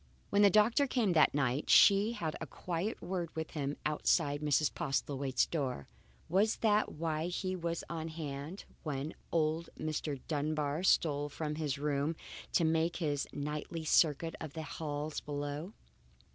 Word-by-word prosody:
When 200 - +4
the 205 - +8
doctor 220 +8 +4
came 230 -8 +1
that 155 -3 +5
night 135 0 0
she 205 +3 +6
had 160 -8 -3
a 160 - -4
quiet 175 - -3
word 175 -2 -2
with 160 0 -4
him 145 -1 -3
outside 150 -1 +1
Mrs. 150 0 +2
Postlethwaite's 135 -4 0
door. 130 - -3 0.4
Was 200 +6 +3
that 215 -1 +2
why 160 0 -2
he 185 +1 -2
was 170 -1 -3
on 165 -1 -4
hand 155 +2 -6 0.2
when 150 0 -3 0.2
old 160 0 +1
Mr. 155 -2 -3
Dunbar 150 0 -1
stole 145 -5 +2
from 150 +1 -3
his 150 -3 -2
room 145 +2 0 0.4
to 170 - +4
make 165 +1 +2
his 145 -5 -1
nightly 150 +3 -4
circuit 160 +1 +3
of 155 -3 -6
the 160 - -5
halls 150 0 -4
below? 145 +5 -4
155 Hz, 150 wpm, -33 LUFS, 145-170 Hz, 0.4 s, the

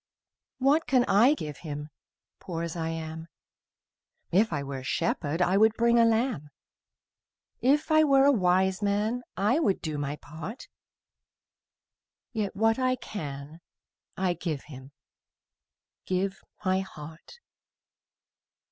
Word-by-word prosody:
What 280 +5 +2
can 255 -2 +4
I 240 +9 +5
give 150 - -6
Him, 150 -2 -6 0.5
Poor 170 -2 -5
as 170 0 -4
I 165 -1 -2
am? 160 0 -6 1.0
If 210 +6 +3
I 145 -3 -2
were 140 -1 -5
a - - -10
shepherd, 165 +3 0
I 185 +2 +2
would 220 +1 +4
bring 235 +1 +3
a 230 - +6
lamb; 225 - 0 1.1
If 295 +5 +2
I 310 0 +6
were 275 -2 +5
a 285 - +6
wise 190 -3 +2
man, 210 +4 0 0.2
I 215 +10 +2
would 200 - +1
do 155 -3 -4
my 145 0 -2
part: 160 - -9 1.7
Yet 210 -4 -2
what 225 +3 +2
I 255 0 +2
can 150 - -7 0.6
I 185 -1 +1
give 165 -4 -4
Him, 135 -2 -12 1.2
Give 190 +1 -1 0.2
my 185 0 +2
heart. 160 - -10
190 Hz, 130 wpm, -28 LUFS, 155-230 Hz, 1.7 s, a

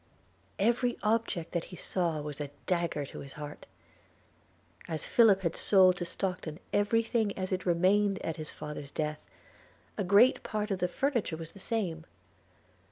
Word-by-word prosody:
Every 240 +4 +2
object 215 -6 0
that 170 -2 -2
he 180 - -10
saw 170 -4 -1
was 150 0 -5
a 145 - -4 0.2
dagger 170 -5 0
to - - -9
his 135 - -9
heart. 150 -1 -8 1.2
As 160 -2 -2
Philip 215 -5 +5
had 170 -3 -1
sold 185 -2 +5
to 175 - -3
Stockton 180 -3 -4
every 210 +3 +3
thing 220 -3 0
as 185 0 -3
it 185 0 -2
remained 195 +3 +3
at 165 - -3
his 155 -1 -4
father's 150 -2 -7
death, 150 +1 -2 0.8
a - - +2
great 200 +7 +5
part 210 0 -3
of 190 - -1
the 180 - +1
furniture 235 - -1
was 165 0 -8
the 195 - -14
same. 185 -7 -2
185 Hz, 165 wpm, -30 LUFS, 160-205 Hz, 1.2 s, Philip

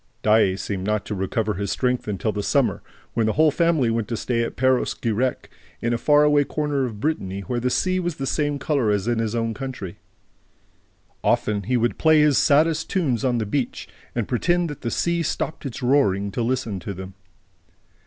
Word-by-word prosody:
Daae 105 -3 +4
seemed 95 -1 -4
not 105 +1 -1
to - - -4
recover 105 +3 -1
his 100 +1 -3
strength 125 +1 0
until 105 +1 -1
the 105 - -3
summer, - - +1 0.3
when 115 -2 +1
the 110 - +1
whole 155 0 +4
family 160 -7 +2
went 115 -2 -1
to 115 - -3
stay 120 0 -1
at 115 - -3
Perros 130 0 +2
Guirec, 120 +2 -1 0.3
in 120 +1 -1
a - - +1
far 150 +2 +4
away 145 -1 +4
corner 145 -2 -1
of 110 -4 -6
Brittany, 100 -9 -2
where 120 +4 -3
the 125 +1 0
sea 185 +7 +1
was 175 -1 -2
of - - -22
the 135 - -3
same 145 +1 0
color 140 -5 0
as 105 0 0
in 120 -1 +1
his 115 0 -1
own 115 -1 -1
country. 130 -9 -6 1.2
Often 105 -2 +1
he 125 +1 +1
would 120 0 0
play 160 -1 +5
his 150 -2 +4
saddest 155 +2 +3
tunes 140 - 0
on 125 -2 +1
the 110 - -1
beach 130 +5 -2 0.3
and 115 -4 -1
pretend 175 +6 +1
that 145 - -9
the 120 - -2
sea 170 +6 0
stopped 155 -1 -3
its 130 +1 -7
roaring 100 -7 +2
to 120 - -3
listen 115 -4 -1
to 100 +2 -6
them. 95 +1 -8
120 Hz, 205 wpm, -23 LUFS, 105-145 Hz, 1.2 s, play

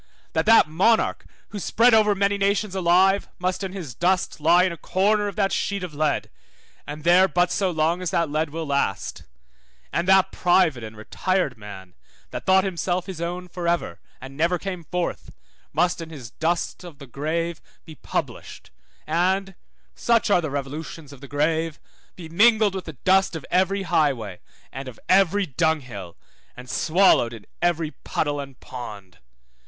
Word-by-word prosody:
That - - 0
that 225 -7 +7
monarch, 190 +9 +2 0.2
who 210 - -6
spread 235 +5 +3
over 210 -2 +5
many 200 +1 +1
nations 200 0 +1
alive, 190 +2 +3
must 185 +1 -2
in 190 - -3
his 175 -10 -7
dust 180 +6 0
lie 170 +4 +5
in 185 - +1
a - - -5
corner 205 +5 +1
of 200 - -5
that 195 -2 +1
sheet 200 -2 -1
of 175 -4 -6
lead, 150 -1 -1 0.6
and 150 +1 -7
there 180 +3 +6
but 180 -1 +1
so 190 +1 +1
long 165 +1 0
as 180 - -2
that 170 0 +1
lead 155 +2 -1
will 160 +2 -5
last; 140 -9 -1 0.7
and 170 - 0
that 190 0 +5
private 175 -8 +2
and 110 0 -9
retired 180 - -1
man, 95 -4 -11 0.4
that - - -7
thought 190 0 +5
himself 180 -1 -2
his 185 -4 -7
own 180 +1 -4
for 175 -1 -5
ever, 170 - -1 0.2
and 135 +1 -10
never 170 +4 +1
came 180 -2 -6
forth, 180 +1 -3 0.4
must 175 +3 +1
in 165 - -7
his 130 -8 -10
dust 170 +5 -2
of 170 -5 -11
the 140 - -11
grave 160 +6 -3 0.2
be 160 - -10
published, 145 - -5 0.3
and 190 +4 0 0.4
(such 230 -2 +1
are 180 - +4
the 155 - -3
revolutions 145 +2 -6
of 135 - -14
the 140 - -9
grave) 155 +3 -1 0.4
be 170 -3 -9
mingled 215 +4 +4
with 190 -1 -5
the 160 - -7
dust 190 +6 +2
of 160 - -6
every 190 +2 +2
highway 130 - 0 0.3
and 135 +1 -7
of 125 - -10
every 195 +1 +4
dunghill, 125 - -2 0.4
and 125 +1 -10
swallowed 160 -9 +3
in 110 -3 -11 0.2
every 170 -3 0
puddle 145 -2 -3
and 135 -2 -8
pond. 105 -7 -9
170 Hz, 170 wpm, -23 LUFS, 145-190 Hz, 0.7 s, that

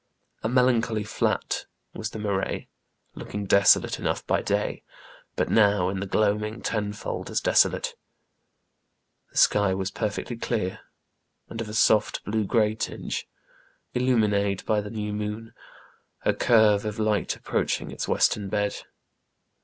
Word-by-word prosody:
A 110 - -1
melancholy 120 -3 +2
flat 105 - -1 0.3
was 110 0 -4
the - - -8
marais, 100 -2 -2 0.5
looking 105 0 -6
desolate 100 +1 +4
enough - - -2
by - - +1
day, - - -1 0.5
but - - 0
now, 100 -4 +3
in 95 0 -3
the 100 - -4
gloaming, 105 +2 0
tenfold 105 -1 -3
as - - 0
desolate. - - +2 1.4
The - - -10
sky 100 -2 +4
was 95 0 -3
perfectly 110 +2 -3
clear, 110 -6 -2 0.7
and 115 - -5
of 110 - -5
a 105 - -6
soft, 110 -1 +3
blue 110 0 0
grey 110 0 +2
tinge; 110 - -4 0.7
illumined 105 -6 +1
by 105 -1 +1
the 105 - -7
new 105 -1 -4
moon, 105 +2 -5 0.7
a - - +3
curve 110 -3 +4
of 105 -1 -4
light 110 -1 0
approaching - - -2
its - - -4
western 100 -2 +1
bed. 105 0 -1
105 Hz, 135 wpm, -26 LUFS, 100-110 Hz, 1.4 s, desolate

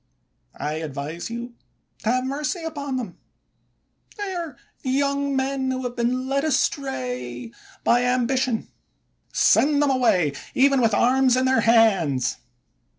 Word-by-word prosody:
I 150 +1 -3
advise 155 +3 -5
you 235 +1 -6 0.5
to 220 - -2
have 255 +1 +1
mercy 300 +6 -3
upon 285 -4 -4
them; 220 -8 -6 1.0
they 405 -2 -4
are 335 -8 -5 0.2
young 280 +1 0
men 265 0 -1
who 260 0 -2
have 245 -1 -4
been 255 +2 -1
led 275 +1 0
astray 125 - -2 0.3
by 240 +1 +4
ambi 250 +1 +1
tion; 250 -4 -1 0.6
send 290 0 +4
them 290 -1 +3
away, 185 - +2 0.2
even 275 0 +4
with 225 -3 +3
arms 255 +2 +3
in 260 - +2
their 260 -3 +3
hands. 195 - +3
255 Hz, 135 wpm, -23 LUFS, 220-275 Hz, 1.0 s, by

